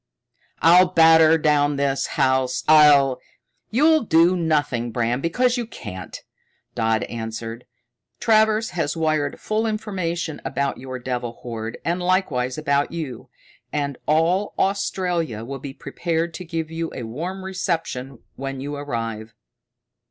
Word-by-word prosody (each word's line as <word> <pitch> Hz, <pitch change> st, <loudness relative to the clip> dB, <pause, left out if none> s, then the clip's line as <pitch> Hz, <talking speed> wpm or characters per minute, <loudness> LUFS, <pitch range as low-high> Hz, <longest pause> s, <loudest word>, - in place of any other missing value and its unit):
"I'll 180 Hz, +3 st, +7 dB
batter 160 Hz, -2 st, +6 dB
down 150 Hz, -2 st, +2 dB
this 140 Hz, -1 st, 0 dB
house. 130 Hz, -1 st, +1 dB
I'll 145 Hz, -4 st, +6 dB, 0.3 s
" 125 Hz, 0 st, -50 dB
"You'll 310 Hz, +7 st, +4 dB
do 170 Hz, -2 st, +4 dB
nothing, 145 Hz, -8 st, 0 dB
Bram, 120 Hz, +2 st, -1 dB
because 245 Hz, -, +1 dB
you 240 Hz, -2 st, -3 dB
can't," 95 Hz, -, -8 dB, 0.5 s
Dodd 110 Hz, -2 st, +1 dB
answered. 115 Hz, +1 st, -6 dB, 0.5 s
"Travers 220 Hz, 0 st, +3 dB
has 165 Hz, -3 st, -2 dB
wired 155 Hz, -3 st, 0 dB
full 220 Hz, +1 st, -1 dB
information 185 Hz, -7 st, -3 dB
about 140 Hz, -1 st, -2 dB
your 130 Hz, 0 st, -6 dB
devil 120 Hz, -1 st, -4 dB
horde, 115 Hz, -2 st, -5 dB
and 175 Hz, +2 st, 0 dB
likewise 155 Hz, -9 st, 0 dB
about 145 Hz, -2 st, 0 dB
you, 150 Hz, -8 st, -6 dB, 0.4 s
and 140 Hz, -2 st, -2 dB
all 170 Hz, +6 st, +2 dB
Australia 180 Hz, -, -1 dB
will 135 Hz, +2 st, -6 dB
be 140 Hz, +1 st, -7 dB
prepared 165 Hz, +5 st, -3 dB
to 180 Hz, +2 st, -7 dB
give 165 Hz, -1 st, -4 dB
you 165 Hz, 0 st, -3 dB
a 125 Hz, -, -5 dB
warm 175 Hz, +12 st, -5 dB
reception 165 Hz, -9 st, -3 dB, 0.2 s
when 135 Hz, 0 st, -5 dB
you 145 Hz, +2 st, -5 dB
arrive." 115 Hz, -5 st, -5 dB
150 Hz, 130 wpm, -22 LUFS, 130-175 Hz, 0.5 s, I'll